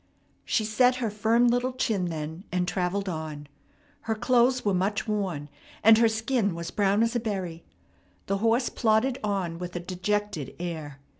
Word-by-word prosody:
She 215 - +1
set 250 +4 +3
her 235 -4 -2
firm 225 +3 +3
little 245 +2 +1
chin 220 -7 0
then, 160 +1 -5
and 180 0 0
travelled 190 +2 -1
on. 155 -4 -5 0.5
Her 225 - -2
clothes 250 +2 +2
were 200 - +2
much 195 +5 0
worn, 190 -9 -2 0.4
and 225 +1 +8
her 230 - +6
skin 220 -3 0
was 170 0 -5
brown 205 +1 +2
as 230 +1 0
a - - +2
berry. 190 -7 -4 0.6
The 195 - 0
horse 230 +3 +2
plodded 240 +3 +1
on 190 -5 -2
with 180 0 -6
a - - -1
dejected 185 -3 -2
air. 160 -5 -5
205 Hz, 165 wpm, -27 LUFS, 175-230 Hz, 0.6 s, and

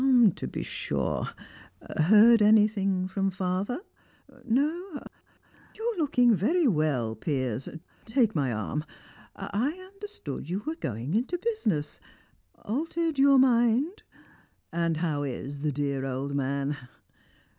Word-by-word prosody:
"To - - -5
be - - -4
sure. - - -2 0.7
Heard 215 +7 +6
anything 205 -3 +3
from 195 +1 -1
father? 190 - -2 0.6
No? 300 - 0 0.8
You're 450 -1 -2
looking 250 -6 +4
very 295 - +2
well, 150 - +1
Piers 130 -1 -2 0.4
take 225 -1 +2
my 140 -6 0
arm. 110 +7 -3 0.5
I 245 +9 -1 0.2
understood 395 - -7
you 195 +4 -2
were 315 - -1
going 130 - -4
into 250 - 0
business. 225 - -2 0.7
Altered 320 +5 -1
your 275 0 +6
mind? 255 - +3 0.7
And 170 -1 0
how 155 -3 -1
is 140 +1 -5
the 150 +1 -1
dear 140 -1 -2
old 135 +1 -3
man?" 140 +1 -1
200 Hz, 115 wpm, -28 LUFS, -, 0.8 s, Heard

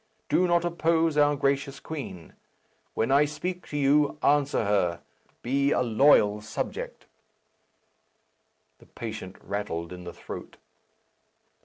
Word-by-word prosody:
Do 180 - +3
not 175 0 +2
oppose 165 -2 +1
our 145 0 +4
gracious 140 0 -1
queen. 135 - -7 0.6
When 115 +4 0
I 140 +2 +5
speak 180 +5 -5
to 145 - -4
you, 145 +1 +3
answer 145 -5 +2
her; 95 -4 +1 0.4
be 140 +3 +1
a 140 - +2
loyal 110 -4 +4
subject." 105 - -5 1.7
The - - -19
patient 110 -5 -7
rattled 90 -4 -4
in 90 0 -9
the 90 - -7
throat. - - -9
140 Hz, 120 wpm, -27 LUFS, 105-150 Hz, 1.7 s, I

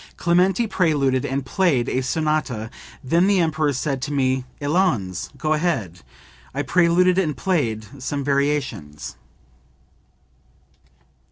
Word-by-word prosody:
"Clementi 180 +6 +2
preluded 145 - +1
and 135 0 -2
played 135 -4 +1
a 130 - 0
sonata; 135 -6 -1 0.3
then 170 +8 +3
the 200 -1 +3
Emperor 155 -3 +1
said 135 0 -2
to 140 - -3
me, 130 -2 +1
'Allons, 145 - 0
go 155 -1 0
ahead.' 150 - -1 0.6
I 145 - -1
preluded 175 +5 +3
and 155 -8 -1
played 130 - -2
some 140 +2 -2
variations.") 140 - -2
145 Hz, 110 wpm, -22 LUFS, 130-170 Hz, 0.6 s, then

